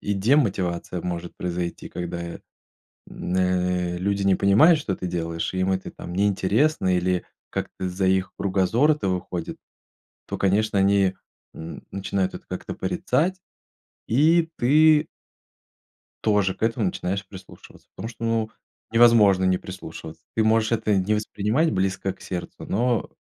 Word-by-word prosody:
и 100 - -1
демотивация 95 - +1
может 85 -1 -5
произойти, 90 -1 -4
когда, 85 0 -5
м, 85 0 -7 0.7
э, 90 -1 0
люди 100 +2 -1
не 95 -1 +4
понимают, 115 - +5
что 95 -10 -2
ты 90 - -5
делаешь, 85 -1 -3
и 95 - -2
им 95 +1 +1
это 95 0 -3
там 85 - -9
неинтересно 100 - +2
или 90 0 0 0.3
как-то 95 - -4
за 95 +2 -1
их 95 0 +1
кругозора 100 +10 +2
это 120 -10 -2
выходит, 90 -2 -4 0.7
то, - - -4
конечно, 100 +1 +1
они, 95 -1 +3 0.4
м, 80 +1 -8
начинают 95 -1 -2
это - - -9
как-то - - -5
порицать, 175 +9 0 0.7
и 160 +7 +3
ты 155 +4 +5 1.1
тоже 105 -3 +2
к - - -17
этому 115 -2 +1
начинаешь 95 +2 -3
прислушиваться, 95 -1 -14
потому 115 - -6
что, 115 -1 -8
ну, 115 -1 0 0.4
невозможно 115 -5 +6
не 95 0 +3
прислушиваться. 80 -3 -9
Ты 110 - +3
можешь 110 0 +3
это 110 -2 +1
не 95 +3 +1
воспринимать 105 +8 0
близко 95 0 -1
к - - -23
сердцу, 90 -2 -6
но, 120 +1 0
95 Hz, 140 wpm, -24 LUFS, 90-115 Hz, 1.1 s, невозможно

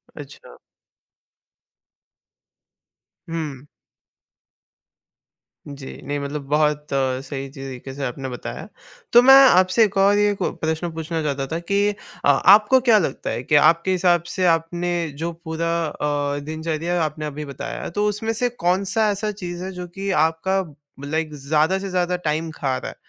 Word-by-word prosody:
अच्छा। - - -12 2.7
हुँ। 150 -5 -5 2.0
जी, 140 -2 -9
नहीं 145 0 -3
मतलब 140 +1 -4
बहुत 150 0 +1
सही 135 +1 -2
ची 135 -1 -11
तरीके 130 0 -8
से 140 0 -6
आपने 130 +1 -5
बताया, 125 - -7 0.5
तो 240 - +9
मैं 270 +2 +8
आपसे 185 +5 +4
एक 200 -1 -4
और 200 +1 +4
ये 205 0 +3
कु - - -1
प्रश्न 160 +2 -3
पूछना 160 0 -3
चाहता 140 -2 -2
था 165 +3 -3
कि 200 +4 -2 0.5
अ, - - +4
आपको 210 - +6
क्या 235 -4 +4
लगता 160 -8 -2
है 120 - -3
कि 150 - +1
आपके 170 +5 +4
हिसाब 175 -2 +2
से 185 - +1
आपने 170 +1 +1 0.3
जो 170 +2 -3
पूरा 165 +1 -2 0.2
अ, 145 -1 -2
दिनचर्या 160 +2 -2
आपने 155 0 -3
अभी 150 0 -5
बताया 140 -1 -6
तो 205 0 +1
उसमें 215 +2 -2
से 245 +2 0
कौन-सा 195 +1 0
ऐसा 210 +1 -2
चीज़ 175 -3 -7
है 190 - -5
जो 180 -1 -7
कि 195 +3 -6 0.2
आपका 190 +4 0 0.4
लाइक 155 +1 -2
ज़्यादा 150 +5 +1
से 195 - -5
ज़्यादा 180 -1 0
टाइम 160 +2 -1
खा 135 -3 -1
रहा - - -6
है? - - -16
165 Hz, 155 wpm, -22 LUFS, 145-190 Hz, 2.7 s, तो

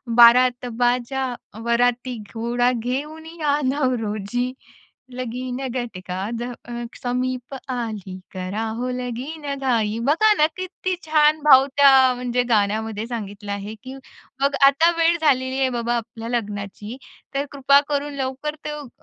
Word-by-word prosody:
बारात 245 +1 +6
बाजा 250 +2 +1 0.4
वराती, 245 +1 +1 0.2
घोडा 240 +2 +1
घेऊन 275 +7 -4
या 305 -3 -1
नवरोजी, 245 -3 -1 0.6
लगीन 250 0 -4
घटका 195 -6 -4
द 240 - -3 0.2
अ, 240 - -10 0.3
समीप 250 +1 -2 0.2
आली, 215 -6 -4
करा 185 +3 -3
हो 250 +1 -2
लगीनघाई 250 -2 -2
बघा 335 +10 +4
ना, 305 - +5
किती 370 0 -3
छान 310 0 +4
भाव 270 -2 +8
त्या 265 -2 +7
म्हणजे 245 0 0
गाण्यामध्ये 220 0 0
सांगितला 205 -3 -5
आहे. 200 +2 -6
की 260 +1 -8 0.5
बघ, 280 - +4 0.2
आता 320 +5 +4
वेळ 335 +1 +3
झालेली 260 -3 +2
आहे 265 - +2
बाबा 240 -1 -1
आपल्या 230 0 -7
लग्नाची, 210 0 -4 0.4
तर 280 +1 0
कृपा 280 0 +5
करून 290 0 -1
लवकर 275 +2 -3
तो 300 -2 -5
250 Hz, 125 wpm, -22 LUFS, 230-280 Hz, 0.6 s, भाव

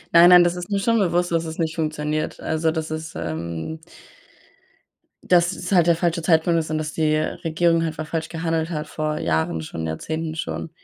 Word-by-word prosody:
Nein, 170 +1 +9
nein, 180 -1 +9
das 175 0 +1
ist 180 +3 -6
mir 200 - 0
schon 230 +3 +2
bewusst, 175 -2 +1
dass 165 0 +1
es 160 0 -6
nicht 160 -2 -1
funktioniert. 155 -1 -2
Also 160 0 0
dass 160 -1 -3
es, 155 0 -5
ähm 85 - -4 1.5
das 175 0 +4
es 180 +1 -6
halt 175 -3 +4
der 170 - +5
falsche 170 0 0
Zeitpunkt 165 0 +3
ist 155 - -4
und 155 - -1
dass 155 0 -3
die 155 -1 +1
Regierung 165 +2 +1
einfach 160 -1 -3
falsch 160 -1 -3
gehandelt 165 0 -2
hat 150 -2 -4
vor 155 0 -3
Jahren, 80 0 0
schon 80 +1 -5
Jahrzehnten, 160 - -4
schon, 165 -1 -4
160 Hz, 195 wpm, -22 LUFS, 155-170 Hz, 1.5 s, Nein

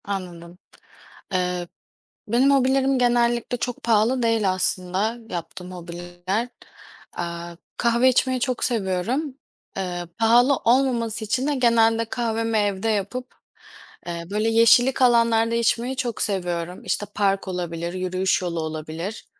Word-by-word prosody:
Anladım. 180 -3 -6 0.7
Eee, 180 -1 -1 0.6
benim 250 +6 +3
hobilerim 270 0 +3
genellikle 240 0 +1
çok 245 0 -4
pahalı 230 +3 +2
değil 225 -4 +2
aslında, 185 +4 -1
yaptığım 180 +1 -6
hobiler. 175 +5 -4 0.7
Eee, 170 0 -5 0.2
kahve 235 +2 +3
içmeyi 255 0 +1
çok 255 -1 -1
seviyorum. 235 - -1 0.4
Eee, 175 -2 -4
pahalı 240 +5 +4
olmaması 235 -3 +1
için 260 +5 0
de 295 - +1
genelde 230 -2 +3
kahvemi 225 -1 -1
evde 205 0 0
yapıp, 220 +5 -3 0.7
eee, 170 -1 -4
böyle 215 +2 +1
yeşillik 235 +4 +5
alanlarda 230 -1 +3
içmeyi 235 +2 +1
çok 245 -3 -3
seviyorum. 180 -3 -2
İşte, 205 - -1
park 195 -2 +1
olabilir, 170 -2 -4
yürüyüş 185 +1 0
yolu 170 -2 -2
olabilir. 160 +5 -5
220 Hz, 120 wpm, -23 LUFS, 180-240 Hz, 0.7 s, yeşillik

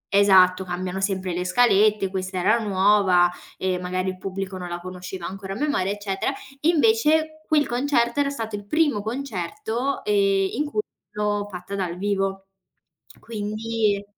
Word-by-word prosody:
esatto, 190 -2 +6
cambiano 185 +1 -4
sempre 190 -2 -1
le 180 +1 -2
scalette, 210 -1 +3
questa 185 0 -3
era 210 +6 +3
nuova 195 -3 +3 0.3
e 185 -1 -1
magari 185 +1 -2
il 185 - -5
pubblico 195 0 -5
non 180 -1 -6
la 175 0 -4
conosceva 180 0 -7
ancora 195 +1 -6
a - - -6
memoria, 240 -7 0
eccetera. 205 +2 -2 0.3
Invece 315 -2 +3
quel 300 -2 +3
concerto 240 0 +1
era 285 -1 +2
stato 225 -6 -4
il 205 0 -8
primo 295 -6 +2
concerto, 230 +2 -3
ehm, 195 -2 +2
in 295 +5 -1
cui 300 +9 -1 0.3
l'ho 205 -1 -1
fatta 180 0 -8
dal 180 -3 -3
vivo. 195 0 -1 0.7
Quindi 215 -1 -2
200 Hz, 150 wpm, -24 LUFS, 185-230 Hz, 0.7 s, esatto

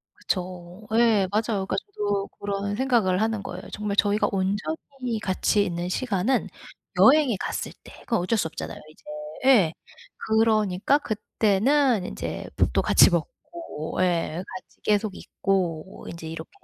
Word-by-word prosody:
그쵸. 180 0 -4
예. 225 -5 +4
맞아요. 215 -2 0
그러니까 - - -2
저도 205 - -2
그런 200 0 -2
생각을 225 -7 +2
하는 220 -2 0
거예요. 180 -1 -6
정말 210 -1 -3
저희가 205 +1 +3
온전히 225 +5 -2
같이 200 +2 +1
있는 175 -1 -3
시간은 230 +2 0 0.5
여행에 275 -5 +6
갔을 - - -3
때. - - -13
그건 230 - 0
어쩔 200 +6 0
수 180 - +1
없잖아요, - - -7
이제. - - -23 0.5
예. 190 -11 +5 0.5
그러니까 220 +1 +3
그때는 220 +1 +1
인제 - - -5
밥도 - - +2
같이 - - +6
먹고. 335 - -5
예. 175 -1 0
같이 185 - -11
계속 210 -1 +1
있고 185 -3 -2
인제 170 -1 -8
이렇게 165 - -7
205 Hz, 295 characters per minute, -25 LUFS, 185-225 Hz, 0.5 s, 여행에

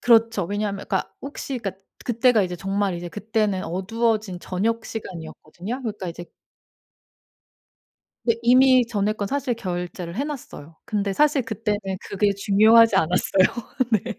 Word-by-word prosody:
그렇죠. 225 -4 +4
왜냐하면 205 +1 -3
그러니까 190 - -1
혹시 275 -1 -5
그러니까 195 -3 -6 0.2
그때가 235 -2 +3
이제 180 -1 -3
정말 195 +1 -1
이제 175 0 -5
그때는 210 0 -1
어두워진 210 +2 -1
저녁시간이었거든요. 195 - -4
그러니까 210 -6 -4
이제 170 +1 -7 2.0
네, 230 - +3
이미 255 0 +6
전에 210 -2 0
건 205 -2 -3
사실 270 +1 -1
결제를 175 -4 -5
해 250 - -1
놨어요. 165 - -8
근데 200 -2 -1
사실 295 +1 +3
그때는 220 -2 -2 0.3
그게 200 +1 +1
중요하지 215 +3 +5
않았어요. 190 +5 +2 0.2
네. 225 +1 0
210 Hz, 345 characters per minute, -23 LUFS, 190-230 Hz, 2.0 s, 이미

